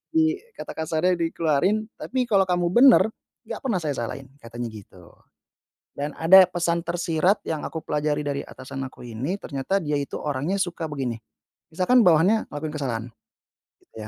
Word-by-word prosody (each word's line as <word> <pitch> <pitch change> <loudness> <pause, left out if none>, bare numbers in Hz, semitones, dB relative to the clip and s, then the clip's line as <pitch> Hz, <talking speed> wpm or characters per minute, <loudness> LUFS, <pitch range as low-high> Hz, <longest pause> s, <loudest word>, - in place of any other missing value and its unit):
I 320 +3 +3 0.2
kata - - -7
kasarnya 160 +3 0
dikeluarin. 170 +6 0
"Tapi 255 0 -2
kalau 195 -3 +4
kamu 175 -1 +1
bener, 245 +7 +7 0.4
enggak - - -6
pernah 220 -8 +1
saya 145 -4 -2
salahin." 135 +3 -8
Katanya 120 -2 -6
gitu. 95 -5 -14 0.8
Dan 145 +1 -5
ada 185 +3 +7
pesan 170 -1 0
tersirat 175 +2 0
yang 155 -2 -3
aku 160 - -6
pelajari 150 0 -1
dari 140 -1 -2
atasan 135 0 -8
aku 125 - -13
ini, 125 - -3
ternyata 140 +2 -2
dia 150 -6 -1
itu 140 - -5
orangnya 150 +6 -2
suka 175 -4 -2
begini, 130 -6 -4 0.5
misalkan 185 +10 +3
bawahannya 185 +4 +4
ngelakuin 150 +1 -5
kesalahan 125 -7 -3 0.8
gitu - - -32
160 Hz, 155 wpm, -24 LUFS, 140-185 Hz, 0.8 s, bener